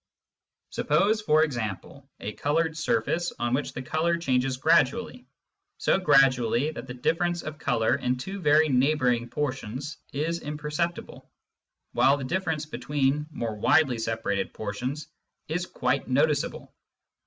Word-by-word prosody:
Suppose, 215 +2 +2
for 155 -5 +4
example, 120 - -4
a 105 - -4
coloured 160 +5 0
surface 160 +4 0
on 120 0 -1
which 140 +3 -1
the 125 - -5
colour 160 +5 0
changes 130 -4 0
gradually 230 - +2 0.3
— - - -57
so - - +2
gradually 135 -4 +3
that 150 - -8
the 125 - -7
difference 170 +6 0
of 155 -1 -7
colour 115 -5 +1
in^^ 125 0 0
two 190 +10 -6
very 155 -2 +4
neighbouring 125 -3 +2
portions 135 0 -4
is 160 +4 -2
imperceptible, 150 +3 -4 0.6
while 135 +2 +4
the 140 - -5
difference 160 0 -2
between 145 +1 -1
more 115 -8 -4
widely 125 +3 +3
separated 110 -3 -2
portions 125 +8 -4 0.4
is 175 +3 -2
quite 125 +2 -1
noticeable. 145 +2 0
145 Hz, 130 wpm, -26 LUFS, 125-160 Hz, 0.6 s, for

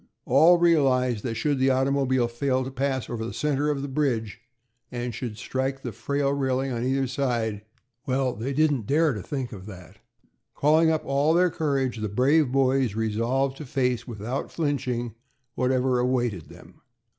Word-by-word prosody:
All 160 +7 +6
realized 130 -9 +2
that 115 -3 -3
should 140 +4 0
the 130 +1 +3
automobile 130 -1 +2
fail 130 +2 -1
to 130 - -6
pass 135 -1 -2
over 115 -2 -4
the 115 - -5
center 150 0 0
of 140 -2 -1
the - - -3
bridge, 125 -6 -1 0.5
and 120 -1 -4
should 115 -1 -5
strike 130 +3 -3
the 120 - -4
frail 140 +6 -1
railing 135 -1 -1
on 120 -1 -2
either 135 +1 +1
side 120 -5 -1 0.5
Well, 130 -1 0
they 125 +4 -4
didn't 145 -6 +1
dare 155 0 +3
to 105 - -5
think 130 +4 -4
of 100 -3 -9
that. 90 -5 -12 0.6
Calling 155 +3 +4
up 160 -1 0
all 140 +4 +2
their 180 0 +3
courage, 135 -6 -1
the 110 -1 -3
brave 130 +6 +3
boys 130 -4 +2
resolved 115 +5 0
to 155 - -7
face, 125 -2 -1
without 120 +3 -4
flinching, 125 -7 -2 0.4
whatever 130 0 +1
awaited 120 -8 -1
them. - - -16
130 Hz, 170 wpm, -25 LUFS, 120-140 Hz, 0.6 s, All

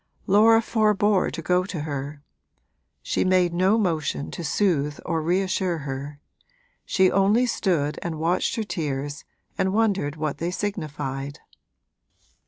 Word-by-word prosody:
Laura 225 +3 +5
forbore 210 -3 +2
to 165 - -6
go 180 +2 +2
to 185 -4 -5
her; 145 0 -5 0.8
she - - 0
made 185 -2 +3
no 190 +5 +3
motion 160 -8 -1
to 170 - -6
soothe 150 -3 0
or 165 -2 -1
reassure 185 +1 0
her, 140 0 -6 0.6
she 190 -1 +3
only 205 +6 +3
stood 170 -11 0
and 165 -2 -4
watched 170 +4 0
her 225 - -1
tears 145 -6 -4 0.3
and 190 0 +1
wondered 195 -10 +1
what 155 -2 -3
they 170 - -1
signified. 145 -8 -4
175 Hz, 130 wpm, -24 LUFS, 150-195 Hz, 0.8 s, Laura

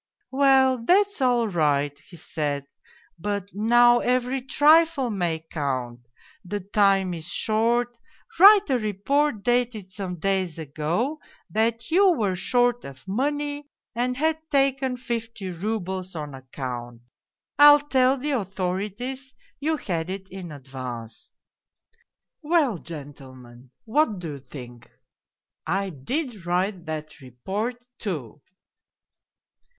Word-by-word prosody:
" - - -68
' - - -59
Well, 265 -3 +5
that's 400 - +3
all 245 -3 +3
right,' 145 -5 0
he 170 +5 -16
said. 145 -3 -3 0.3
' - - -31
But 200 -1 -3
now 240 +4 +5
every 250 +2 0
trifle 295 0 +4
may 170 -5 -2
count; 125 -5 -3 0.4
the 205 +3 -4
time 195 -1 +2
is 160 -1 -6
short, 235 +5 0 0.4
write 405 +2 +9
a 255 - +2
report 215 +4 0
dated 240 -5 0
some 185 -1 -5
days 185 -1 -1
ago 165 - -2 0.3
that 230 +5 0
you 380 +2 +5
were 210 - 0
short 245 +5 +1
of 140 +5 -11
money 290 +6 -2 0.2
and 250 +1 -1
had 315 +2 +1
taken 270 -3 +1
fifty 230 -5 -4
roubles 190 -1 -4
on 150 -3 -5
account. 125 -3 -7 0.6
I'll 290 0 +9
tell 265 -2 +2
the 290 +3 -2
authorities 210 +5 -3 0.2
you 310 +2 0
had 170 - -3
it 190 0 -6
in 185 -3 -8
advance.' 130 -5 -8 0.6
" 460 +1 -44
Well, 295 - +2
gentlemen, 130 -6 -11 0.2
what 230 -2 +2
do 175 -3 -6
you 140 - -7
think? 125 -3 -11 0.8
I 195 +1 -1
did 215 - -4
write 180 0 -1
that 155 -1 -6
report, 205 - -5
too 150 - -5
205 Hz, 125 wpm, -25 LUFS, 160-255 Hz, 0.8 s, write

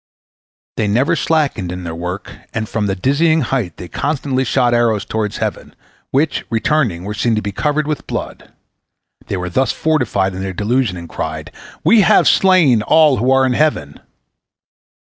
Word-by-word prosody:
They 105 - 0
never 125 +10 +2
slackened 145 - 0
in 90 0 -6
their 85 -1 -5
work, 90 +3 -5 0.2
and 110 0 -2
from 105 -1 -2
their 95 - -1
dizzy 155 - +2
height 120 - -2
they 90 - -8
constantly 135 - -1
shot 125 -1 +1
arrows 115 -4 +1
toward 105 -1 -3
heaven, - - -4 0.3
which, 145 +4 0
returning, 115 - 0
were 105 +2 -4
seen 110 +2 0
to 110 - -1
be 100 - -3
covered 150 +8 -1
with 155 -1 -4
blood. - - -6 0.8
They 100 - -2
were 90 0 -4
thus 125 +8 +1
fortified 120 -12 0
in 95 - -6
their 95 0 -4
delusion, 110 +1 0
and 85 -1 -8
they - - -17
cried, 80 0 -5 0.3
"We 210 +7 +5
have - - +4
slain 170 - +4
all 155 +2 +4
who 125 +4 0
are 135 0 +4
in 130 - +1
heaven." 120 - 0
120 Hz, 175 wpm, -17 LUFS, 95-145 Hz, 0.8 s, We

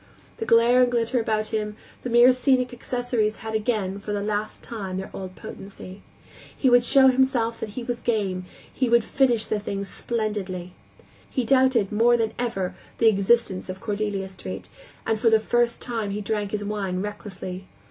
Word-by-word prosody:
The 450 - -4
glare 235 +2 +5
and 250 -1 +3
glitter 240 +1 +1
about 215 -1 -1
him, 210 -1 -2 0.3
the 250 - -4
mere 240 +2 +7
scenic 255 0 +2
accessories 245 -3 -1
had 220 0 -7
again, 215 -3 0
and 200 +1 -8
for 210 - -3
the 200 -1 -1
last 210 0 -3
time, 195 -5 -5
their 190 - -5
old 185 -1 -7
potency. 195 0 -10 0.6
He 260 - +3
would 245 0 +6
show 265 +2 +6
himself 255 -3 +1
that 215 +1 -6
he 250 - -3
was 240 0 -4
game, 195 -6 -1 0.3
he 255 -3 0
would 235 -1 +5
finish 245 -4 +2
the 215 - -1
thing 200 -1 -4
splendidly. 195 -5 -3 0.6
He 255 - -1
doubted, 255 -4 +3
more 235 +3 +4
than 225 -1 -1
ever, 195 -7 -2 0.2
the 230 - +6
existence 200 -2 +1
of 185 +1 -5
Cordelia 205 -2 -2
Street, 190 -1 -8 0.4
and 220 - 0
for 230 - +4
the 220 0 +5
first 240 +1 +1
time 225 -4 -2
he 205 +1 -3
drank 210 -1 -2
his 205 0 -3
wine 195 -3 -2
recklessly. 190 -3 -7
220 Hz, 180 wpm, -25 LUFS, 200-240 Hz, 0.6 s, mere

